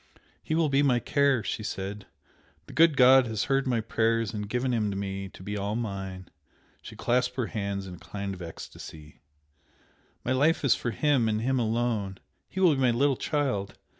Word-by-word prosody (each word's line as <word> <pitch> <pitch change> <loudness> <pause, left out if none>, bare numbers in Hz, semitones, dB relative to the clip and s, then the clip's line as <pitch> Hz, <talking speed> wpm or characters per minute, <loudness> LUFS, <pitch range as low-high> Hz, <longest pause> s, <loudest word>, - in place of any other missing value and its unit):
"He 155 - -2
will 165 -1 +3
be 140 0 +3
my 135 -4 +3
care!" 140 -3 +2
she - - -3
said 100 -1 -5 0.6
"The - - -12
good 165 -3 +5
God 130 0 +7
has 110 -2 -1
heard 135 -1 +1
my 120 -3 +1
prayers 115 0 0
and 105 -1 -4
given 125 +2 0
him 110 -3 +1
to 100 - -3
me 95 -1 -4
to 95 - -13
be 105 +1 -4
all 100 +1 -2
mine!" 95 -5 -5 0.5
She - - -10
clasped 125 +1 0
her 125 -2 -1
hands 100 -3 -3
in 90 - -8
a 90 - -11
kind 100 +4 -5
of 90 - -10
ecstasy, 80 -2 -10 1.0
"My 120 - 0
life 145 +4 +2
is 135 - +6
for 120 - -3
him 130 -2 +2
and 110 0 0
him 130 +2 +1
alone! 110 -4 -1 0.3
He 190 - -5
will 180 -4 +5
be 135 - -1
my 130 - +4
little 135 +4 +2
child! 125 -10 -2
115 Hz, 195 wpm, -28 LUFS, 100-130 Hz, 1.0 s, God